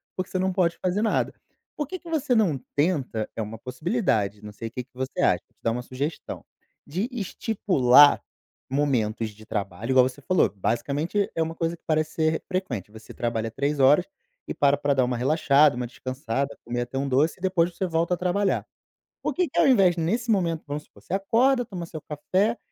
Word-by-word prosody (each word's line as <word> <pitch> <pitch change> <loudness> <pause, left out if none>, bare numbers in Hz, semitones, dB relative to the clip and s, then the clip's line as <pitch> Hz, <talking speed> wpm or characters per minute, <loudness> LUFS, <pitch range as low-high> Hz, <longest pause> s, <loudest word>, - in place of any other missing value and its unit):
porque 185 0 -3
você 185 - -1
não 190 0 0
pode 175 -2 +1
fazer 185 +3 +1
nada. 220 - +1 0.4
Por 295 -3 -2
que 370 +2 -6
que 340 - -12
você 295 -5 0
não 180 - +2 0.2
tenta 145 -8 0
é - - -2
uma 110 +1 -5
possibilidade, 125 - -1
não 105 - -8
sei 115 +2 -6
o - - -9
que 125 +1 -5
que 125 - -32
você 130 +1 -4
acha, - - +3
vou - - -40
te - - -44
dar 115 - +2
uma 125 +2 -2
sugestão, 140 +6 -5 0.4
de 185 +10 -2
estipular 175 - +4 0.5
momentos 120 -6 0
de 110 +1 -15
trabalho, 105 +2 -3
igual 130 -1 +5
você 130 +3 -13
falou, 185 +5 +2
basicamente 145 - -1
é 165 - -1
uma 160 0 -2
coisa 165 +1 -2
que - - -46
parece 155 0 +1
ser 160 0 +1
frequente. 135 - -3
Você 110 +1 -12
trabalha 115 -1 -2
3 140 +4 -1
horas 145 +7 +5 0.4
e - - -3
para 140 0 +4
pra 145 0 +1
dar 130 -2 +3
uma 125 -1 -1
relaxada, 145 +1 +4
uma 125 0 -2
descansada, 130 +2 -4
comer 120 +1 -2
até 130 +2 -4
um 140 +1 -1
doce 140 +5 +2
e - - -23
depois 180 -2 +1
você 190 - -1
volta 170 +1 +1
a - - -13
trabalhar. 190 +2 0 0.6
Por - - -1
que 360 -1 +1
que - - -8
ao - - +5
invés 195 -9 +5
nesse 225 +9 -1
momento 170 -7 +1
vamos 145 +1 -4
supor, - - -21
você - - -7
acorda, 245 +7 +3
toma 180 -6 -6
seu 160 -2 -8
café 190 +11 0
150 Hz, 210 wpm, -25 LUFS, 125-185 Hz, 0.6 s, igual